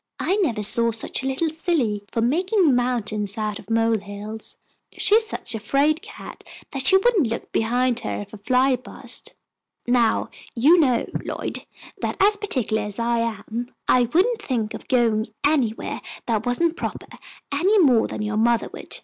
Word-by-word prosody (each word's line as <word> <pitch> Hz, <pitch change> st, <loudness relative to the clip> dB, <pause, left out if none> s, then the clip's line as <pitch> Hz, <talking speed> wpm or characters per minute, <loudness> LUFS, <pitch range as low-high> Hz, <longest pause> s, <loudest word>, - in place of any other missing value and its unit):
"I 385 Hz, -, +1 dB
never 245 Hz, -, 0 dB
saw 230 Hz, +3 st, +2 dB
such 225 Hz, +4 st, -2 dB
a 265 Hz, -, -3 dB
little 305 Hz, +4 st, -1 dB
silly 305 Hz, -, 0 dB
for 230 Hz, -, -1 dB
making 355 Hz, -, +2 dB
mountains 215 Hz, -5 st, -1 dB
out 215 Hz, -1 st, -2 dB
of -, -, -14 dB
mole 225 Hz, -1 st, +2 dB
hills. 205 Hz, +2 st, -9 dB, 0.4 s
She -, -, +2 dB
is 445 Hz, 0 st, +5 dB
such 240 Hz, -, -4 dB
a 225 Hz, -, -3 dB
fraid 285 Hz, +8 st, +1 dB
cat -, -, -11 dB, 0.3 s
that 270 Hz, -1 st, +2 dB
she 380 Hz, -, +7 dB
wouldn't 390 Hz, -, +3 dB
look 230 Hz, +1 st, -5 dB
behind 245 Hz, +2 st, +1 dB
her -, -, -4 dB
if 205 Hz, +1 st, -11 dB
a 215 Hz, -, -9 dB
fly 255 Hz, +4 st, +3 dB
buzzed. 250 Hz, -, -6 dB, 0.5 s
Now 240 Hz, -2 st, +2 dB, 0.2 s
you 300 Hz, +9 st, +5 dB
know, 255 Hz, -7 st, +2 dB, 0.2 s
Lloyd, -, -, -5 dB, 0.3 s
that, -, -, -3 dB
as 410 Hz, +2 st, +5 dB
particular 255 Hz, -, -1 dB
as 210 Hz, -1 st, -5 dB
I 235 Hz, 0 st, +1 dB
am, 230 Hz, +2 st, -4 dB
I 250 Hz, -1 st, +4 dB
wouldn't 435 Hz, +7 st, +2 dB
think 230 Hz, -, -2 dB
of -, -, -9 dB
going 230 Hz, -3 st, +2 dB, 0.2 s
anywhere 265 Hz, -7 st, 0 dB, 0.2 s
that 225 Hz, -1 st, -1 dB
wasn't 325 Hz, +7 st, +1 dB
proper, -, -, -4 dB, 0.5 s
any 365 Hz, +10 st, +3 dB
more 265 Hz, -, +4 dB
than -, -, -5 dB
your 210 Hz, 0 st, -2 dB
mother 235 Hz, +1 st, +2 dB
would. -, -, -6 dB
245 Hz, 175 wpm, -23 LUFS, 220-310 Hz, 0.5 s, she